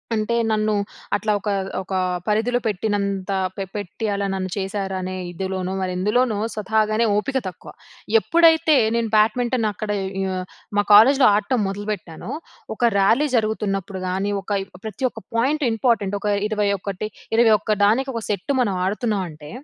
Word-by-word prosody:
అంటే 220 +2 0 0.2
నన్ను 215 0 +1 0.4
అట్లా 215 +1 0
ఒక 205 +1 -4 0.3
ఒక 190 +1 -7 0.3
పరిధిలో 225 +4 +1
పెట్టినంత 200 -2 -1 0.3
పె 195 - -2
పెట్టి 205 +2 -5
అలా 200 0 -1
నన్ను 185 -1 -3
చేశారనే 190 -1 -3 0.2
ఇదిలోనో, 190 +1 -3
మరెందులోనో 205 +5 +1 0.2
స్వతహాగానే 215 +1 +1
ఓపిక 265 +6 0
తక్కువ. 180 - -9 0.5
ఎప్పుడైతే 325 +1 +4 0.2
నేను 230 -1 0
బ్యాడ్మింటన్ 230 +2 +2
అక్కడ 210 +2 -4 0.3
ఇ - - 0 0.5
మా 205 - +4
కాలేజ్‌లో 260 +6 +7
ఆడటం 215 +4 0
మొదలుపెట్టానో, 195 -4 -5 0.4
ఒక 245 - -4 0.2
ర్యాలీ 230 +10 +4
జరుగుతున్నప్పుడు 200 -4 -1
గానీ, 195 +2 -1
ఒక 195 - -14
ఈ - - -12 0.2
ప్రతి 220 +5 -6
ఒక్క - - -10 0.2
పాయింట్ 275 +5 +1
ఇంపార్టెంట్. 225 -4 +1
ఒక - - -2 0.2
21 200 -1 -1 0.3
ఇరవై 230 -2 +6
ఒక్క 215 - -3
దానికి, 260 +6 +2
ఒక 230 - -2
సెట్టు 205 +5 -1
మనం 205 -5 +1
ఆడుతున్నాం 210 0 -1
అంటే, 150 -1 -12
210 Hz, 140 wpm, -22 LUFS, 195-230 Hz, 0.5 s, కాలేజ్‌లో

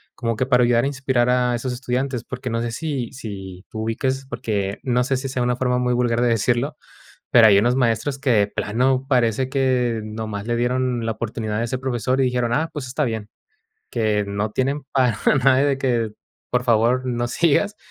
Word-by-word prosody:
como 115 -2 -2
que 130 - 0
para 125 -1 +4
ayudar 120 -1 +3
a - - +2
inspirar 130 -3 0
a 125 -1 +2
esos 125 +2 -3
estudiantes? 125 0 -2
Porque 125 0 -6
no 115 0 -1
sé 120 -1 -2
si 135 -3 -3
si 95 -7 -8
tú 110 - -5
ubiques 130 +4 -2
porque 100 -5 -2
no 125 -1 +1
sé 135 +1 0
si 135 +1 -4
sea 130 -1 -1
una 125 0 +1
forma 125 0 0
muy 125 0 +1
vulgar 120 -1 +1
de 125 - +3
decirlo, 120 +5 0 0.5
pero 115 -2 +7
hay 100 -2 +6
unos 120 +4 +3
maestros 125 +2 0
que, 135 -1 -1
de 105 -3 +4
plano, 130 +6 0
parece 125 -1 +2
que 125 -4 +1
nomás 110 -1 -5
le 120 - 0
dieron 125 -1 0
la 115 - 0
oportunidad 110 -1 -4
a 115 - 0
ese 125 +2 -2
profesor 130 0 -1
y 135 - +4
dijeron: 125 -2 0
"Ah, 155 +6 +1
pues 145 -4 -5
está 140 +4 -1
bien", 110 -4 -4 0.6
que 110 -3 +1
no 100 +1 -2
tienen 135 +5 -1
para 125 -5 +2 0.3
nada 135 -1 +5
de 140 -2 +1
que: 120 -5 0 0.4
"Por 125 0 +1
favor, 120 +2 +2
no 120 -1 -1
sigas". 170 +10 +1
125 Hz, 205 wpm, -22 LUFS, 115-130 Hz, 0.6 s, pero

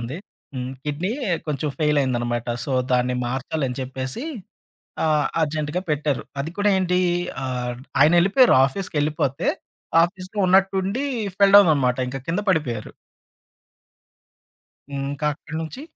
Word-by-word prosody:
ఉంది. 120 +6 -5 0.4
హ్మ్. 125 0 -4
కిడ్నీ 150 +7 -2 0.4
కొంచెం 150 0 -2
ఫెయిల్ 150 -1 +2
అయిందనమాట. 120 -2 -1 0.2
సో, - - -5 0.2
దాన్ని 125 0 +2
మార్చాలని 135 +1 -3
చెప్పేసి, 130 - -4 0.8
ఆహ్, 150 -2 +2 0.2
అర్జెంట్‌గా 155 +2 -1
పెట్టారు. 150 -2 0 0.2
అది 150 +4 -3
కూడా 205 0 +3
ఏంటీ 180 0 +1 0.4
అహ్, 125 -1 -2 0.3
ఆయనెళ్ళిపోయారు 180 - +5
ఆఫీస్‌కెళ్ళిపోతే. 150 -4 -1 0.6
ఆఫీస్‌లో 185 +3 -7
ఉన్నట్టుండి 195 +6 +2 0.3
ఫెల్‌డౌన్ 200 -2 +7
అనమాట. 125 -3 +1
ఇంక 135 +1 -5
కింద 175 +5 0
పడిపోయారు. 125 - -1 2.0
హ్మ్. 135 0 -3
ఇంకా 145 +2 -3
అక్కడి 160 +2 -9
నుంచి 205 - -7
150 Hz, 115 wpm, -23 LUFS, 130-180 Hz, 2.0 s, ఫెల్‌డౌన్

